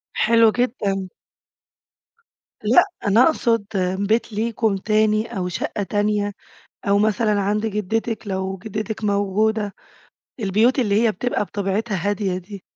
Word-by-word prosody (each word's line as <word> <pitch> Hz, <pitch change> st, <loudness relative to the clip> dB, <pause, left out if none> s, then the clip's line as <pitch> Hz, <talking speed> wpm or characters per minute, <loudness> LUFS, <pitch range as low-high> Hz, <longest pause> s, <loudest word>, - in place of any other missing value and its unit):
حلو 230 Hz, 0 st, +4 dB
جدًا. 205 Hz, -6 st, -1 dB, 1.5 s
لأ، 220 Hz, +4 st, +6 dB, 0.2 s
أنا 220 Hz, +5 st, +5 dB
أقصد 230 Hz, -8 st, +2 dB, 0.4 s
بيت 225 Hz, +1 st, 0 dB
ليكم 220 Hz, -1 st, 0 dB
تاني 215 Hz, +1 st, +1 dB
أو 180 Hz, -, -1 dB
شقة 205 Hz, +3 st, -3 dB
تانية، 205 Hz, 0 st, 0 dB, 0.5 s
أو 200 Hz, -, +4 dB
مثلًا 210 Hz, 0 st, +2 dB
عند 210 Hz, +2 st, 0 dB
جدتِك 220 Hz, +2 st, -2 dB
لو 190 Hz, 0 st, -3 dB
جدتِك 215 Hz, +1 st, -5 dB
موجودة، 205 Hz, +1 st, 0 dB, 0.7 s
البيوت 220 Hz, +6 st, +2 dB
اللي 215 Hz, -3 st, +2 dB
هي 225 Hz, -2 st, +3 dB
بتبقى 245 Hz, +2 st, -1 dB
بطبيعتها 200 Hz, +2 st, -2 dB
هادية 195 Hz, -3 st, -1 dB
دي. 190 Hz, +1 st, -10 dB
210 Hz, 120 wpm, -21 LUFS, 200-225 Hz, 1.5 s, لأ